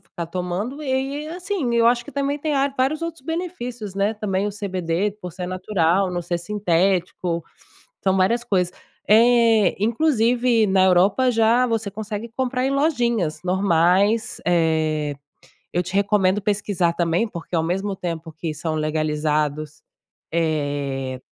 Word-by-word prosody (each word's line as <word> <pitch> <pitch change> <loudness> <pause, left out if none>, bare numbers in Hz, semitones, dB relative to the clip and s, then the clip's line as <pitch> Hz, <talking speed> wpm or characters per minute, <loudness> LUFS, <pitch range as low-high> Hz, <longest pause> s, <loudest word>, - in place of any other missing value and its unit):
ficar 170 - -7
tomando, 185 - -4
e 275 +1 -2
e - - -7
assim, 360 0 -3
m 240 -1 0
Eu 230 0 +5
acho 240 0 +1
que 290 - -11
também 280 +1 -1
tem 300 0 -1
ar 275 0 +1
vários 275 +5 +1
outros 330 -5 -5
benefícios, 250 - -4
né. 200 +2 +1
Também 205 -2 -1
o - - -1
CBD, 195 -1 -2
por 180 -2 -7
ser 180 0 -5
natural, 185 0 +1
não 175 0 -2
ser 175 0 -2
sintético, 180 -2 0 0.6
são 190 -1 +3
várias 235 +6 +2
coisas. 180 -6 +1 0.4
Eh, 225 -2 +5
inclusive 235 -2 +2
na 190 -1 +3
Europa, 190 +8 +4
já 230 +2 +3
você 225 -3 -2
consegue 215 +2 -6
comprar 255 0 0
em 270 - 0
lojinhas 240 - 0
normais. 190 +4 +2
Eh, 155 -3 +1 0.6
eu 175 - +1
te 185 +2 -8
recomendo 200 -1 +2
pesquisar 200 -4 0
também, 170 +4 +1
porque 175 -4 -5
ao 160 - +2
mesmo 195 +4 -2
tempo 165 -2 -5
que 160 0 -5
são 155 +1 -3
legalizados, 155 -1 -1 0.5
eh, 145 -5 -1
195 Hz, 150 wpm, -22 LUFS, 170-235 Hz, 0.6 s, Eu